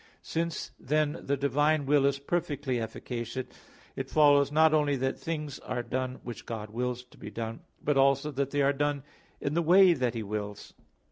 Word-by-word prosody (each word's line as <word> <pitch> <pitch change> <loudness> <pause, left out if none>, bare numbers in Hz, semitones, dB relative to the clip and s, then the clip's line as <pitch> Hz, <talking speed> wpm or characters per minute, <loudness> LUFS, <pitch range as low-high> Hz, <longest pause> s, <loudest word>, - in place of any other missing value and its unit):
Since 165 -1 -3
then 150 +1 0
the 140 +1 +1
divine 145 +2 +2
will 140 0 +4
is 140 0 +1
perfectly 140 -4 -2
efficacious, 120 +2 -4 0.5
it 135 0 -4
follows 145 -1 +5
not 160 +1 +5
only 150 -2 +3
that 130 0 -1
things 150 -4 -4
are 120 -1 -4
done, 130 +1 -3
which 120 -1 -8
God 110 -2 -5
wills 125 +2 -2
to 125 - -21
be 105 - -7
done, 115 +1 -5 0.2
but 145 -2 +1
also 140 +2 +3
that 140 -1 -1
they 145 0 +1
are 140 +1 +3
done 145 0 -1 0.4
in 140 - -2
the 170 - +2
way 180 +2 +7
that 125 -5 -1
He 115 - -2
wills. 105 0 -5
140 Hz, 185 wpm, -29 LUFS, 125-150 Hz, 0.5 s, way